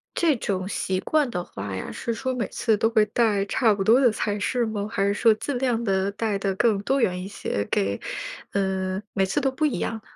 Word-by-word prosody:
这 320 -5 +3
种 190 -3 -2
习 185 -2 -1
惯 300 -4 +1
的 180 -6 -3
话 100 - -6
呀， 95 - -5
是 235 - -3
说 260 +3 -2
每 235 -5 -2
次 225 -3 +1
都 225 +2 +2
会 220 -2 +4
带 210 -4 +1
差 225 +2 +2
不 195 - -1
多 235 +6 +5
的 245 - +5
菜 210 -1 -2
式 240 +3 0
吗？ 210 -2 -3
还 200 -4 +1
是 200 - +2
说 225 +2 +4
尽 275 +5 -4
量 240 -3 0
地 195 -1 +1
带 210 -2 -1
得 195 -1 -1
更 215 0 +2
多 270 +6 +1
元 180 -5 +1
一 - - -6
些 150 - -3
给 100 0 0 0.5
呃， 190 -1 -1
每 195 - +2
次 245 - 0
都 270 -2 +1
不 285 - -4
一 300 -4 +2
样 - - -2
呢？ 220 - -7
210 Hz, 255 characters per minute, -25 LUFS, 195-235 Hz, 0.5 s, 多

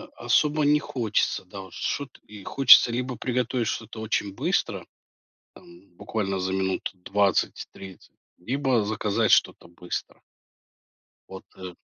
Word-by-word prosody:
особо 145 +6 +2
не 150 +1 +4
хочется, 115 -10 -1
да, 95 +2 -10
вот 95 -2 -13
что-т 140 -2 -4
и 105 -2 -12
хочется 125 +1 +7
либо 125 +1 -3
приготовить 125 -1 -1
что-то 115 +1 -5
очень 105 -2 -2
быстро, - - -1 0.7
там 85 +3 -17
буквально 100 -2 -3
за 95 +1 -2
минут 95 0 -1
20-30, 95 0 -2 0.2
либо 130 +3 0
заказать 110 +1 0
что-то - - +2
быстро. 85 +1 -7 1.1
Вот 95 0 -10
и 90 -1 -8
105 Hz, 120 wpm, -25 LUFS, 95-125 Hz, 1.1 s, хочется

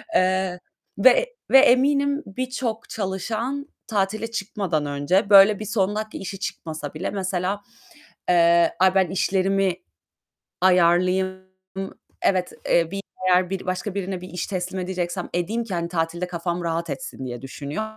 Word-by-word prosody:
eee, 185 -1 +2 0.4
ve - - +8
e - - +2 0.3
ve 270 - +9
eminim 280 +2 +3
birçok 245 +1 -4
çalışan 225 +8 -3 0.2
tatile 215 +2 -1
çıkmadan 195 -8 -2
önce 145 +8 +1
böyle 200 0 +8
bir 215 - -5
son 205 -2 0
dakika 215 0 -4
işi 195 0 -6
çıkmasa 155 -6 -5
bile - - -3
mesela, 190 0 -2 0.7
eee, 170 -1 +5
"Ay, 185 0 +5
ben 190 -3 +3
işlerimi 195 0 +1 0.9
ayarlayayım. 185 +1 +3 0.8
Evet, 185 -2 +1 0.2
eee, 170 -1 +3
bir, 195 0 -4 0.3
eğer 180 0 +4
bir 195 -1 -4
başka 185 +2 -3
birine 190 -2 -3
bir 180 - -9
iş 180 - -4
teslim 185 0 -3
edeceksem 180 0 -3
edeyim 205 +7 -1
ki 215 - -6
hani 170 0 -2
tatilde 170 +1 -2
kafam 175 0 -3
rahat 165 0 -2
etsin." 135 -1 -6
diye 120 -1 -6
düşünüyor. 140 +7 -5
185 Hz, 145 wpm, -23 LUFS, 175-205 Hz, 0.9 s, ve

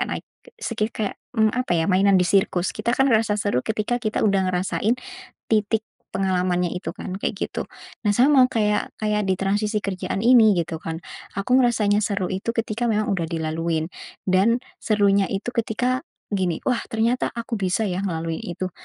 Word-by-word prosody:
kayak - - -1
naik - - -4 0.2
ke 485 - -17
sekih 220 -2 -1
kayak, 210 -3 -3 0.2
mmm, 220 -1 +4
apa 245 -8 0
ya, 160 - +2
mainan 195 +1 +4
di 180 - +3
sirkus. 185 -1 +2
Kita, 235 - -1
kan, 270 - +4
ngerasa 215 -1 +2
seru 205 -11 +1
ketika 220 +2 -1
kita 215 0 0
udah 195 -2 +2
ngerasain 190 +6 0 0.5
titik 215 0 +2 0.3
pengalamannya 180 -2 +1
itu 180 - -5
kan, 190 -1 -6
kayak 205 - -2
gitu. - - -5 0.4
Nah, 205 - +3
sama 260 +2 +6
kayak 210 -4 0
kayak 210 -1 +1
ditransisi 205 +3 0
kerjaan 190 0 -3
ini 230 -3 +6
gitu, 160 0 -6
kan. 165 +2 -6 0.3
Aku 250 +6 +2
ngerasanya 220 -5 +3
seru 200 -3 -1
itu 195 +5 -2
ketika 230 0 -1
memang 215 -2 +1
udah 175 -4 0
dilaluin. 160 0 -2 0.3
Dan 200 +6 +2 0.2
serunya 200 -2 +3
itu 200 +5 -3
ketika 250 +5 -1 0.2
gini, 185 -5 0
"Wah, 250 -2 +2
ternyata 230 +3 0
aku 235 0 -4
bisa, 190 +2 0
ya, 180 -2 -2
ngelalui 165 -3 -2
itu. 185 +1 -4
205 Hz, 170 wpm, -23 LUFS, 185-225 Hz, 0.5 s, sama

